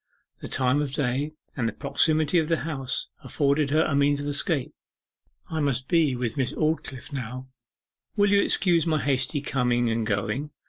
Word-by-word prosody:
The -, -, -7 dB
time 130 Hz, +2 st, +1 dB
of 140 Hz, -3 st, -3 dB
day, 140 Hz, +3 st, -1 dB, 0.2 s
and 115 Hz, -4 st, 0 dB
the -, -, -8 dB
proximity 155 Hz, +1 st, +2 dB
of 160 Hz, -, -1 dB
the 165 Hz, -, +1 dB
house, 135 Hz, -5 st, -2 dB
afforded 140 Hz, 0 st, +1 dB
her 155 Hz, +3 st, +3 dB
a 155 Hz, -, -1 dB
means 140 Hz, 0 st, +3 dB
of 145 Hz, -, -4 dB
escape. 145 Hz, 0 st, 0 dB, 0.8 s
'I 160 Hz, -, -2 dB
must 135 Hz, -3 st, -1 dB
be 160 Hz, -6 st, +2 dB
with 120 Hz, -1 st, -3 dB
Miss 130 Hz, -3 st, -1 dB
Aldclyffe 155 Hz, -3 st, -2 dB
now 130 Hz, 0 st, -6 dB, 0.7 s
will 205 Hz, -2 st, +3 dB
you 200 Hz, 0 st, +5 dB
excuse 175 Hz, -5 st, +2 dB
my 155 Hz, -1 st, +2 dB
hasty 140 Hz, +1 st, 0 dB
coming 125 Hz, -4 st, 0 dB
and 115 Hz, -1 st, -1 dB
going? 110 Hz, +7 st, -2 dB
140 Hz, 175 wpm, -25 LUFS, 130-155 Hz, 0.8 s, you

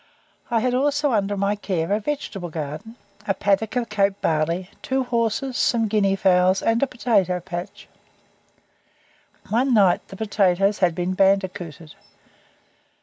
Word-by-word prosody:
I 230 Hz, -2 st, +1 dB
had 250 Hz, +1 st, 0 dB
also 290 Hz, +2 st, +1 dB
under 205 Hz, -1 st, 0 dB
my 200 Hz, +1 st, 0 dB
care 185 Hz, -4 st, -3 dB
a 210 Hz, -, +1 dB
vegetable 210 Hz, -8 st, -4 dB
garden, 155 Hz, +8 st, -6 dB, 0.3 s
a 195 Hz, -, +1 dB
paddock 205 Hz, +3 st, 0 dB
of 240 Hz, -2 st, -1 dB
Cape 200 Hz, -1 st, +1 dB
barley, 165 Hz, +4 st, -1 dB
two 265 Hz, 0 st, -1 dB
horses, 245 Hz, +2 st, -1 dB
some 230 Hz, -2 st, +2 dB
guinea 200 Hz, -2 st, +2 dB
fowls, 185 Hz, -1 st, +3 dB
and 225 Hz, +1 st, +2 dB
a 275 Hz, -, +2 dB
potato 205 Hz, -8 st, +1 dB
patch. 185 Hz, +3 st, -7 dB, 1.6 s
One 245 Hz, +3 st, +2 dB
night 195 Hz, -4 st, +3 dB
the -, -, -10 dB
potatoes 200 Hz, -1 st, +1 dB
had 175 Hz, -3 st, +2 dB
been 180 Hz, +2 st, -1 dB
bandicooted. 185 Hz, -5 st, 0 dB
200 Hz, 140 wpm, -23 LUFS, 180-230 Hz, 1.6 s, fowls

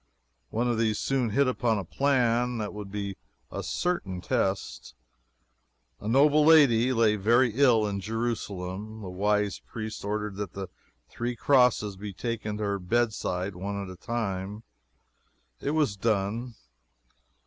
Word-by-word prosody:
One 120 Hz, +3 st, 0 dB
of 120 Hz, -2 st, 0 dB
these 110 Hz, -2 st, +1 dB
soon 130 Hz, -4 st, 0 dB
hit 135 Hz, +6 st, +2 dB
upon 120 Hz, -3 st, +1 dB
a 100 Hz, -, -2 dB
plan 125 Hz, -, +1 dB
that 105 Hz, -2 st, -3 dB
would 105 Hz, -2 st, -7 dB
be 100 Hz, -1 st, -4 dB, 0.3 s
a -, -, -4 dB
certain 105 Hz, -, -2 dB
test. 95 Hz, +2 st, -2 dB, 1.0 s
A 105 Hz, -, -7 dB
noble 145 Hz, +5 st, +5 dB
lady 135 Hz, -6 st, +6 dB
lay 115 Hz, -3 st, +3 dB
very 120 Hz, +5 st, +4 dB
ill 120 Hz, -4 st, +4 dB
in 100 Hz, -1 st, -2 dB
Jerusalem. 110 Hz, -2 st, -4 dB
The 95 Hz, -, -6 dB
wise 105 Hz, +2 st, 0 dB
priests 110 Hz, -1 st, -7 dB
ordered 105 Hz, -1 st, -3 dB
that 100 Hz, -4 st, -4 dB
the 95 Hz, -2 st, -6 dB, 0.4 s
three 120 Hz, +1 st, -4 dB
crosses 125 Hz, -6 st, +3 dB
be 100 Hz, 0 st, -6 dB
taken 110 Hz, -1 st, -3 dB
to 105 Hz, -, -3 dB
her 100 Hz, -1 st, -1 dB
bedside 100 Hz, -2 st, -1 dB
one 100 Hz, +2 st, -4 dB
at 100 Hz, -2 st, -6 dB
a -, -, -12 dB
time. 100 Hz, -1 st, -4 dB, 1.0 s
It -, -, -2 dB
was 150 Hz, -10 st, +2 dB
done. 110 Hz, +3 st, -1 dB
110 Hz, 145 wpm, -28 LUFS, 100-120 Hz, 1.0 s, lady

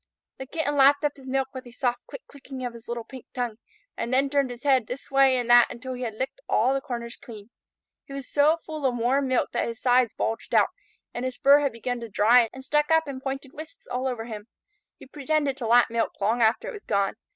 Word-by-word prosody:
The 265 Hz, -, -7 dB
Kitten 290 Hz, -1 st, -2 dB
lapped 285 Hz, +2 st, +5 dB
up 290 Hz, -, 0 dB
his 270 Hz, -1 st, -14 dB
milk 265 Hz, 0 st, -1 dB
with 260 Hz, -1 st, -8 dB
a -, -, -12 dB
soft 245 Hz, 0 st, -2 dB
click 275 Hz, -, -10 dB
clicking 270 Hz, -2 st, -9 dB
of 245 Hz, -, -4 dB
his 230 Hz, 0 st, -13 dB
little 235 Hz, -1 st, -4 dB
pink 260 Hz, +2 st, -12 dB
tongue, 240 Hz, -4 st, -3 dB, 0.4 s
and 235 Hz, -, -4 dB
then 270 Hz, +2 st, +2 dB
turned 280 Hz, -2 st, +1 dB
his 245 Hz, +1 st, -9 dB
head 265 Hz, -5 st, +3 dB
this 265 Hz, +2 st, -7 dB
way 270 Hz, -1 st, +5 dB
and 245 Hz, -1 st, -2 dB
that 240 Hz, 0 st, +8 dB
until 255 Hz, +1 st, -7 dB
he 250 Hz, -, -7 dB
had 230 Hz, -3 st, -4 dB
licked 265 Hz, -, -4 dB
all 265 Hz, -, +3 dB
the 275 Hz, -, -1 dB
corners 235 Hz, -2 st, -6 dB
clean. 215 Hz, -1 st, -12 dB, 0.5 s
He 275 Hz, -, -11 dB
was 275 Hz, -2 st, -6 dB
so 300 Hz, +3 st, +3 dB
full 310 Hz, -2 st, -6 dB
of 245 Hz, -1 st, -1 dB
warm 260 Hz, +4 st, +1 dB
milk 255 Hz, -1 st, 0 dB
that -, -, -1 dB
his 230 Hz, 0 st, -6 dB
sides 245 Hz, -2 st, +3 dB
bulged 225 Hz, -, -3 dB
out, -, -, +5 dB, 0.4 s
and 240 Hz, -, -4 dB
his 255 Hz, -1 st, -3 dB
fur 280 Hz, +1 st, +6 dB
had 285 Hz, -2 st, 0 dB
begun 240 Hz, +2 st, -4 dB
to 230 Hz, -1 st, -7 dB
dry 225 Hz, +3 st, +4 dB
and 265 Hz, -, -10 dB
stuck 295 Hz, +2 st, +1 dB
up 320 Hz, -1 st, +3 dB
in 265 Hz, -2 st, -6 dB
pointed 270 Hz, 0 st, -5 dB
wisps 315 Hz, +11 st, -10 dB
all 255 Hz, +2 st, -3 dB
over 240 Hz, -3 st, -3 dB
him. 215 Hz, -2 st, -8 dB, 0.5 s
He -, -, -13 dB
pretended 290 Hz, 0 st, -1 dB
to 235 Hz, -, -4 dB
lap 240 Hz, 0 st, +5 dB
milk 230 Hz, 0 st, -2 dB
long 220 Hz, +4 st, +1 dB
after 225 Hz, +1 st, +2 dB
it -, -, -5 dB
was 420 Hz, -, -10 dB
gone. 200 Hz, -2 st, 0 dB
255 Hz, 245 wpm, -25 LUFS, 235-275 Hz, 0.5 s, that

